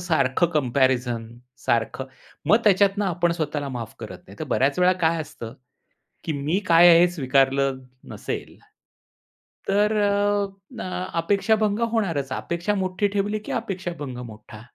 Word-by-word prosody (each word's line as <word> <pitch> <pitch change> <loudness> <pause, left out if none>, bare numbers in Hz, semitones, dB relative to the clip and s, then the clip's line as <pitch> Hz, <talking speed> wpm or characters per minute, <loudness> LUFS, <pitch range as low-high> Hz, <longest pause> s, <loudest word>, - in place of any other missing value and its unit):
सारखं 160 -3 +1
कम्पॅरिझन 125 -5 +1 0.4
सारखं, 120 +3 0 0.4
मग 215 - +6
त्याच्यातून 200 0 +3
आपण 175 -1 +1
स्वतःला 150 -3 -3
माफ 120 -4 -6
करत 100 -5 -8
नाही. 100 +1 -14
तर - - -2
बऱ्याचं 140 +6 +1
वेळा 180 +1 +5
काय 160 0 +2
असतं? 115 -5 -9 0.7
की 165 - -2
मी 150 +6 -1
काय 170 +1 +7
आहे? 170 0 +8
हे 175 - +6
स्वीकारलं 135 -2 +1 0.3
नसेल, - - -6 1.1
तर 210 +2 +2
अ, 205 0 +1 0.4
अ, 185 0 -4
अपेक्षाभंग 205 +4 +1
होणारचं. 165 - -1
अपेक्षा 170 +5 -2
मोठी 190 +1 0
ठेवली 205 +2 0
की - - -5
अपेक्षाभंग 170 -9 -4
मोठा. 105 0 -12
165 Hz, 135 wpm, -24 LUFS, 130-195 Hz, 1.1 s, आहे